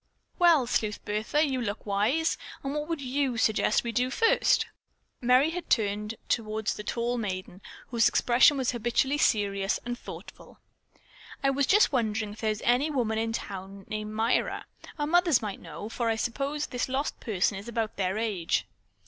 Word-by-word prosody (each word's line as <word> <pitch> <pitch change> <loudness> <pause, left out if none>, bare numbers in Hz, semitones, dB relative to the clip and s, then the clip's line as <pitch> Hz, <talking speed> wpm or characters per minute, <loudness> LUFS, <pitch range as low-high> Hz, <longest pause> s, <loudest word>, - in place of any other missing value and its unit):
"Well, 335 -7 +5
Sleuth 215 -3 -1
Bertha, 220 +9 +1
you 260 -2 -1
look 205 -2 -4
wise. 215 +11 +1 0.3
What 295 +2 -3
would 325 -4 -2
you 265 -1 -1
suggest 220 0 +2
that - - +3
we 235 - -2
do 245 +3 +1
first?" 455 +12 +3 0.6
Merry 255 +5 +4
had 355 +1 -6
turned 210 0 0
toward 220 -2 -1
the 210 - -1
tall 240 +3 -1
maiden, 185 -3 -5 0.3
whose 235 -2 +4
expression 250 +4 +4
was 260 -2 +1
habitually 245 +4 0
serious 200 -5 +1
and 245 0 -2
thoughtful. - - -11 0.9
"I 275 - +4
was 275 0 +1
just 420 -3 +5
wondering 220 -5 -1
if 215 - -12
there 220 - +1
is 215 -1 -3
any 250 +6 +3
woman 230 -6 0
in 225 0 -1
town 195 -2 -6
named 215 0 -4
Myra. 225 +3 0 0.3
Our 295 - -1
mothers 345 -3 +4
might 205 -2 -5
know, 165 +5 -7
for 230 +1 -2
I 225 - +2
suppose 275 +6 -2
this 250 0 -3
lost 270 +3 -2
person 200 -3 0
is 205 - -11
about 225 -2 -3
their 190 +1 0
age." 205 -7 0
230 Hz, 175 wpm, -28 LUFS, 210-270 Hz, 0.9 s, Well